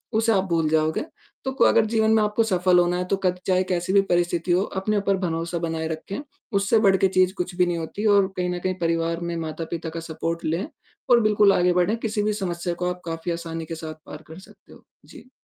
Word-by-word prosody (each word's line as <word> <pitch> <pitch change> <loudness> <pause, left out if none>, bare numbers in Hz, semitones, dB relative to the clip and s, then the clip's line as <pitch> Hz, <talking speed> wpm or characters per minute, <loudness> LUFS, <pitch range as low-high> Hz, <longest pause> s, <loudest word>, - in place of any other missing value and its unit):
उसे 225 +1 +3
आप 190 -3 +3
भूल 165 -2 +1
जाओगे। 155 0 +1 0.4
तो 265 - -1
क - - +8
अगर 220 - +4
जीवन 220 0 +2
में 220 - +4
आपको 210 +2 +1
सफल 180 -3 +3
होना 175 0 +2
है 180 - -2
तो 195 - +1
कद 180 0 +1
चाहे 185 -1 +3
कैसी 185 0 -2
भी 200 - +6
परिस्थिति 175 0 +1
हो, 180 - +3
अपने 205 +1 -2
ऊपर 200 -1 +1
भरोसा 170 -1 -2
बनाएँ 160 -1 -2
रखें, 160 +5 -5 0.3
उससे 200 +3 +3
बढ़ 195 -3 +4
के 195 - +3
चीज़ 185 0 +2
कुछ 180 0 -3
भी 180 0 +3
नहीं 175 -1 -1
होती 165 +6 -5
और 195 -1 +4
कहीं 180 0 -1
न 180 0 -3
कहीं 185 0 -1
परिवार 165 0 0
में 170 0 -3
माता-पिता 160 +1 -5
का 165 +1 -6
सपोर्ट 165 +1 -4
लें 165 - -1 0.4
और 240 - +7
बिल्कुल 210 -2 +4
आगे 180 0 +3
बढ़ें, 180 +5 +1
किसी 220 -2 -2
भी 215 - +1
समस्या 175 -3 -3
को 180 +1 -2
आप 180 0 -5
काफ़ी 165 +1 -4
आसानी 165 -1 -5
के 165 - -6
साथ 160 -1 -7
पार 150 +1 -10
कर 160 +3 -11
सकते 190 - -18
हो। - - -17 0.2
जी। 255 - -15
180 Hz, 235 wpm, -24 LUFS, 165-195 Hz, 0.4 s, क